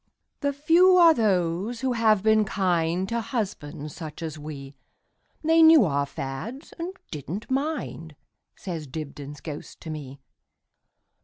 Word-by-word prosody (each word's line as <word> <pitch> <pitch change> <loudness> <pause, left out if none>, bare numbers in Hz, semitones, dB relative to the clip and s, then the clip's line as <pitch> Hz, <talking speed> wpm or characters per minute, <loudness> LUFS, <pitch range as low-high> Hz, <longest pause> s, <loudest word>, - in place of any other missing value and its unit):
The 285 -1 0
few 335 +6 +5
are 335 -2 +8
those 200 - 0
who 260 -1 0
have 220 -4 +3
been 220 0 +4
kindTo 185 +2 0
husbands 155 - -4
such 160 -1 -7
as 155 -1 -5
we; 145 -2 -8 0.7
They 325 +1 +5
knew 320 -7 +8
our 140 -3 0
fads, 140 - -6
and 355 +3 -4 0.2
did 145 -4 -7
n't 205 +9 -5
mind,"Says 175 - -5
Dibdin's 145 0 -7
ghost 150 -3 -8
to 160 - -6
me. 140 -3 -8
185 Hz, 130 wpm, -25 LUFS, -, 0.7 s, are